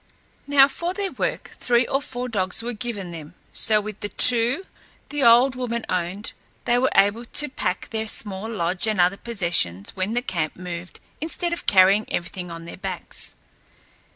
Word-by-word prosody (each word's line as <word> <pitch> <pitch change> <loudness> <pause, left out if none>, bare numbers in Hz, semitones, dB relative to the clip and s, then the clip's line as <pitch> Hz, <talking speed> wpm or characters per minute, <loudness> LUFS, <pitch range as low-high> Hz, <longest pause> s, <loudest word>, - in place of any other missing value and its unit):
Now, 280 -1 +7
for 340 +6 -3
their 400 -1 -2
work, - - -3
three 240 0 +3
or 270 +3 0
four 250 -2 -5
dogs 195 -2 -1
were 240 +1 -3
given 210 -5 -5
them, 165 0 -9 0.2
so 215 -1 +4
with 210 0 -7
the 205 - -4
two 245 - +4 0.5
the 290 -1 -2
old 245 +2 +6
woman 240 -2 -3
owned, 185 +4 -2 0.3
they 240 +1 +3
were 260 - +2
able 205 +4 +4
to 290 +4 +2
pack 180 -7 -3
their 220 -1 -2
small 205 0 -2
lodge 185 -1 0
and 215 -3 0
other 180 +2 +3
possessions 170 - -1
when 190 +3 -2
the 245 - 0
camp 165 - -2
moved, 175 0 -7 0.2
instead 340 +2 -1
of 340 - -5
carrying 195 +2 +5
everything 175 +1 -4
on 165 0 -8
their 170 - -9
backs. 185 -3 -3
215 Hz, 175 wpm, -23 LUFS, 180-245 Hz, 0.5 s, Now